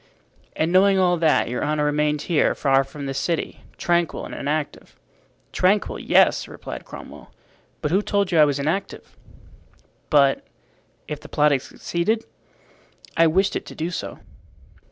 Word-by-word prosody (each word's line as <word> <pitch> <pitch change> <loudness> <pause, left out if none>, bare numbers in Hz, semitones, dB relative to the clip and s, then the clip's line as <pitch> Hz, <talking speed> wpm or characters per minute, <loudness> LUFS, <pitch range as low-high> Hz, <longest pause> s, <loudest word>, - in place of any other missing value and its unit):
"And 160 +2 0
knowing 195 +1 +5
all 180 -1 +3
that, 160 -2 +2
your 125 +1 -3
honor 150 0 0
remained 150 0 0
here, 170 -4 +2
far 135 -1 +3
from 140 +1 -9
the 135 - -3
city, 135 +5 -2 0.2
tranquil 175 -1 0
and - - -9
inactive." 150 +1 -4 0.5
"Tranquil, 195 +3 +1
yes," - - +3
replied - - -8
Cromwell. - - -11 0.5
"But 150 - -1
who 190 +4 +3
told 200 -2 0
you 165 - +3
I 150 - +8
was 145 -2 0
inactive?" 160 +8 -3 0.9
"But—if 145 +1 -1
the - - -13
plot 150 0 +3
had 135 -2 +1
succeeded?" 215 +11 -2 0.9
"I 165 0 +5
wished 190 +5 +1
it - - -4
to - - -10
do 165 +2 -3
so." 170 - -5
155 Hz, 150 wpm, -23 LUFS, 145-180 Hz, 0.9 s, I